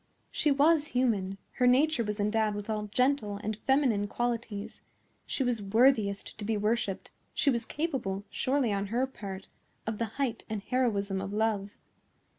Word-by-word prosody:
She 300 - +1
was 295 +2 +4
human; 200 -6 +1 0.2
her 250 - +4
nature 275 +1 +4
was 210 -1 -3
endowed 210 0 +1
with 205 +1 -4
all 210 -1 -2
gentle 235 -2 +1
and 215 +1 -1
feminine 245 -4 +2
qualities; 230 -2 -3 0.5
she 270 - -1
was 245 -4 0
worthiest 215 -1 +2
to - - -4
be 215 +1 0
worshipped; 210 -2 -1 0.2
she 280 - +3
was 235 -2 -1
capable, 255 - -2
surely, 260 -5 +1
on 200 0 -1
her 240 +5 +1
part, 195 -7 -8 0.4
of 220 -1 -3
the 230 - +1
height 260 -5 -1
and 215 -2 -3
heroism 205 -7 0
of 195 0 -4
love. 210 -2 0
220 Hz, 160 wpm, -30 LUFS, 205-255 Hz, 0.5 s, was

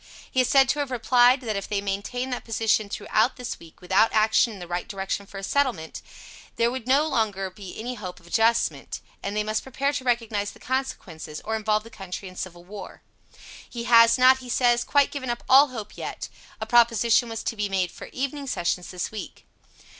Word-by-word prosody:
He 260 - +3
is 250 - 0
said 270 -2 +5
to 295 - +1
have 285 -2 -1
replied, 250 +1 +4
that 220 -4 -3
if 200 - -4
they 205 - 0
maintained 205 +6 -3
that - - -4
position 220 -2 +1
through - - -6 0.3
this 250 -1 -6
wee, 165 -1 -15
without 190 +4 +3
action 220 +2 +3
in 210 - -9
the 175 -2 -8
right 175 +1 -3
direction 195 -1 -4
for 195 - -10
a 195 - -7
settlement, 235 - -1 0.5
there 235 +1 +2
would 255 -2 -6
no 280 +4 +4
longer 210 -8 0
of 185 - -7
any 220 +5 -6
hope 185 -6 -8
of 170 - -22
adjustment, 225 +6 +1 0.2
and 200 +1 -3
they 210 - +1
must 215 +1 -1
prepare 275 +2 -2
to 280 - -3
recognize 225 -5 0
the - - -17
consequences, 190 - -4
or 220 - -1
involve 215 -1 0
the 230 - -13
country 190 -1 -7
in 185 - -11
civil 175 -2 -7
war. 200 +3 -10 0.7
He 235 -1 -5
has 230 0 +6
not, 260 +1 +6
he 255 -1 -11
says, 240 0 +3
quite 285 +1 +3
given 265 -3 -5
up 240 0 -3
all 275 +3 +7
hope 220 -5 -8
yet. - - -6 0.3
A - - -3
proposition 235 -1 +4
was 225 0 -5
to - - -2
be 210 -1 -2
made 185 -2 0
for - - -10
evening 275 +1 -4
sessions 180 -6 -1
this 180 -1 -4
week. 215 - -8
225 Hz, 210 wpm, -25 LUFS, 200-250 Hz, 0.7 s, all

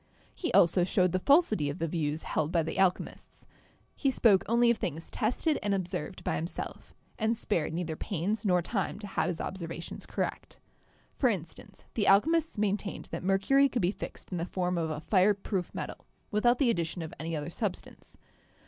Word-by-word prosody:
He 355 - -3
also 175 +1 +5
showed 185 0 +2
the 185 - +1
falsity 220 - +3
of 145 - -4
the 165 - -1
views 155 -1 -1
held 155 +1 -1
by 170 -2 +2
the 165 +4 -4
alchemists. 185 -2 -1 0.5
He 275 - +1
spoke 220 -7 +4
only 235 +1 +5
of 235 - 0
things 165 0 -4
tested 255 +7 0
and 205 -1 +1
observed 185 0 -4
by - - 0
himself, 165 +3 -6 0.2
and 220 +1 +1
spared 170 -9 0
neither 165 -1 -3
pains 200 +6 -2
nor 180 -4 +3
time 195 0 -2
to 205 - -8
have 195 - -1
his 175 -3 -2
observations 170 -2 -6
correct. - - -4 0.6
For 255 - +2
instance, 170 -7 -6
the 210 - 0
alchemists 320 +10 +4
main 205 -1 +2
tained 205 - -7
that - - -4
mercury 200 +9 +3
could 245 -6 -1
be 175 - +3
fixed - - -9
in 180 - -2
the 165 - -1
form 180 -1 -1
of 165 -2 -1
a 155 -1 -4
fire 200 +3 +4
proof 195 -2 -3
metal, - - -6 0.2
without 240 +3 +3
the 260 -5 +3
addition 170 -2 -2
of 160 - -7
any 165 +1 -3
other 150 -1 -4
substance. - - -5
190 Hz, 190 wpm, -30 LUFS, 170-220 Hz, 0.6 s, also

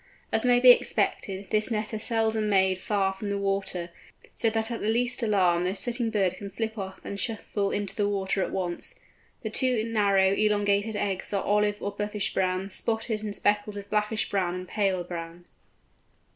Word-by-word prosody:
As 220 - +2
may 245 -1 +5
be 250 0 +10
expected, 200 -4 0
this 215 +2 +2
nest 215 -1 -2
is 215 - -2
seldom 220 -2 +1
made 190 -2 +3
far 195 -2 0
from 200 +2 -5
the 200 - -1
water, 195 -3 -2 0.4
so 230 - +1
that 225 +1 -1
at 230 - -4
the 210 - 0
least 245 +3 +1
alarm 185 -6 +3
the 185 +2 -1
sitting 235 +2 -1
bird 195 -5 +1
can 200 - -7
slip 220 +2 -3
off 190 -3 -6
and 200 - -5
shuffle 205 -3 -2
into 205 -1 -2
the 205 -1 +1
water 195 -1 0
at - - -1
once. 180 - -3 0.5
The 220 - -3
two 250 -2 +2
narrow 200 -4 +3
elongated 205 0 +1
eggs 195 -2 -2
are 200 - 0
olive 205 0 +1
or 200 - -1
buffish 210 0 -2
brown, 185 +1 0
spotted 220 +1 -2
and 210 -1 -4
speckled 205 0 +1
with 200 0 -8
blackish 210 +1 +1
brown 180 -3 0
and 185 0 -6
paler 190 -2 0
brown. 170 0 -7
205 Hz, 185 wpm, -27 LUFS, 190-220 Hz, 0.5 s, be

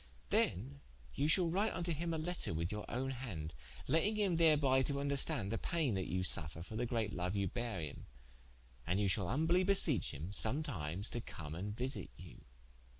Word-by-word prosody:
Then 70 +1 +1 0.3
you 145 - +1
shall 170 +3 +4
write 195 +6 +1
vnto 175 -1 -1
him 165 +2 -2
a 165 - -1
letter 165 - -1
with 85 +3 -1
your 105 -1 -5
owne 130 +2 -2
hande, 95 -12 -5 0.3
letting 195 +7 +3
him 200 -5 +2
therby 145 -5 +5
to 140 - -1
vnderstande 140 -5 +2
the 115 - -1
paine 160 - 0
that 95 -2 -2
you 90 0 -1
suffer 80 -2 +1
for 110 - -8
the 120 +2 -1
great 115 -4 -1
loue 90 +1 -1
you 100 - +1
beare 115 -3 -3
him, 75 -3 -7 0.8
and 90 +3 +1
ye 105 - +2
shal 95 -1 0
humblie 160 - +2
beseech 185 - +3
him, 80 +7 -6
some 110 +10 +1
times 95 - -3
to 120 - -3
come 75 -8 -7
and 100 +6 -4
visite 130 +2 -3
you. 85 -9 -12
120 Hz, 195 wpm, -36 LUFS, -, 0.8 s, therby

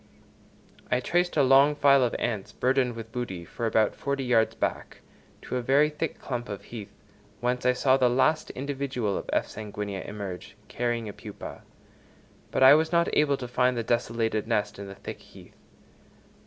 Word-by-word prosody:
I 125 - +2
traced 175 +6 0
a 145 - +5
long 135 +3 +5
file 140 -2 +5
of 120 - 0
ants 110 -5 -3
burthened 130 -2 +1
with 115 -1 -8
booty, 95 -9 -5
for 115 +6 -3
about 110 -1 +2
forty 140 -1 -3
yards 115 -3 +2
back, - - -3 0.4
to 125 - -3
a - - -1
very 140 +5 +3
thick 150 +1 -3
clump 120 -2 -5
of 100 -1 -6
heath, 110 -4 -8 0.5
whence 125 +1 0
I 125 - +5
saw 130 +1 +3
the 125 -2 +3
last 155 +6 +2
individual 135 -6 -3
of - - -5
F. - - +1
sanguinea 105 -2 -6
emerge, 100 -3 -7
carrying 120 -2 -2
a 105 - -6
pupa; 105 0 -9 0.9
but - - +1
I 130 - +10
was 160 +2 +3
not 170 0 +2
able 145 -2 +3
to 125 - -6
find 125 0 +1
the 115 - -1
desolated 115 -2 -1
nest 105 -3 -1
in 100 - -7
the 95 - -9
thick - - -8
heath. - - -16
125 Hz, 180 wpm, -27 LUFS, 110-135 Hz, 0.9 s, I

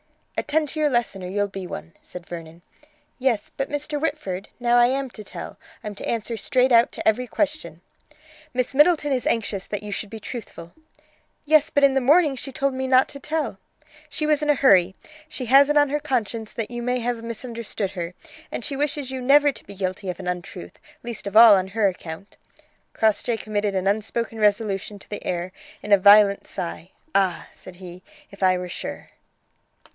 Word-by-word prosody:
"Attend 300 0 0
to 310 - -5
your 300 -1 +3
lesson, 240 -7 -1
or - - -5
you'll 205 +2 -1
be 195 -2 -7
one," 80 - -8
said 180 -1 -10
Vernon. 165 0 -9 0.6
"Yes, 245 -5 0
but, 270 - -3
Mr. 295 0 -3
Whitford, 200 - -3
now 240 0 +2
I 240 0 +6
am 265 0 -2
to 215 - -10
tell. - - -9 0.2
I'm 210 - -5
to 200 - -6
answer 230 0 -2
straight 255 +3 +1
out 235 0 +5
to - - -4
every 245 +3 +2
question." 305 +5 -3 0.7
"Miss 250 +1 -1
Middleton 295 0 +4
is 255 - 0
anxious 205 -4 -1
that 205 -1 -4
you 210 - -6
should 205 - -4
be 220 - -8
truthful." 195 -8 -9 0.7
"Yes; 310 +1 +4
but 285 -3 +1
in 275 -1 +6
the 270 - +2
morning 295 +2 +4
she 270 +1 -5
told 275 +1 -1
me 260 0 -3
not 260 0 +5
to 280 - -8
tell." 300 -8 -3 0.5
"She 300 +1 -3
was 300 -1 +2
in 300 - -1
a 295 - +5
hurry. 190 -9 +4 0.3
She 255 - -5
has 275 +4 +6
it 295 - +3
on 290 -1 +4
her 295 +2 0
conscience 230 -6 -2
that 225 0 -4
you 240 0 -4
may 250 +1 0
have 235 -1 -2
misunderstood 230 -3 -5
her, 175 -1 -5 0.4
and - - -5
she 280 - -2
wishes 290 -1 -2
you 260 -1 -4
never 285 +3 +5
to - - -11
be 200 - -11
guilty 185 0 -3
of 180 - -5
an 185 - -7
untruth, 175 - -6 0.2
least 235 -4 -6
of 200 - 0
all 225 -1 +10
on 190 -1 +2
her 205 +1 +1
account." 180 0 -7 0.6
Crossjay 220 +2 +1
committed 205 -2 -2
an 190 0 -1
unspoken 220 +3 -1
resolution 205 -1 0
to 195 - -15
the 205 - -6
air 175 +1 -3 0.3
in 210 - -6
a 200 - +8
violent 200 0 +6
sigh: 170 0 -6 0.2
"Ah!" 190 -3 +1
and - - -24
said: 180 -1 -11 0.3
"If 200 - -15
I 185 -1 +4
were 180 0 -5
sure!" - - -7
225 Hz, 200 wpm, -23 LUFS, 195-270 Hz, 0.7 s, all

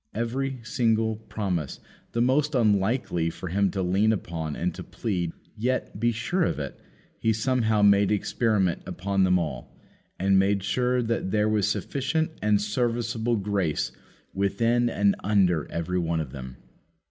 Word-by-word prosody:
Every 130 +3 -2
single 110 -1 +1
promise, 95 -8 -3 0.3
the 120 - +2
most 145 +4 +2
unlikely 105 -6 +2
for 85 +2 -7
Him 100 +2 +2
to 95 +1 -2
lean 100 +5 +3
upon 85 -7 -3
and - - -1
to - - -7
plead, 90 -6 -3 0.2
yet, 120 -2 -2
be 120 +2 +2
sure 115 +12 -1
of 165 - +1
it, 70 -2 -5 0.4
He 110 - +2
somehow 110 -2 +1
made 100 0 +5
experiment 105 -3 +1
upon 95 +1 0
them 90 0 +4
all, 75 -8 -5 0.4
and 95 +1 +3
made 100 0 +2
sure 125 +4 +1
that 115 -4 -1
there 105 +1 +2
was 105 -1 +2
sufficient 145 +8 -1
and 105 -1 +3
serviceable 115 +2 0
grace 100 -6 -1 0.4
within 115 +5 +1
and 100 -2 +2
under 95 -6 +2
every 85 +2 -1
one 85 -1 0
of 75 -5 -4
them. 65 -2 -8
105 Hz, 150 wpm, -26 LUFS, 95-115 Hz, 0.4 s, made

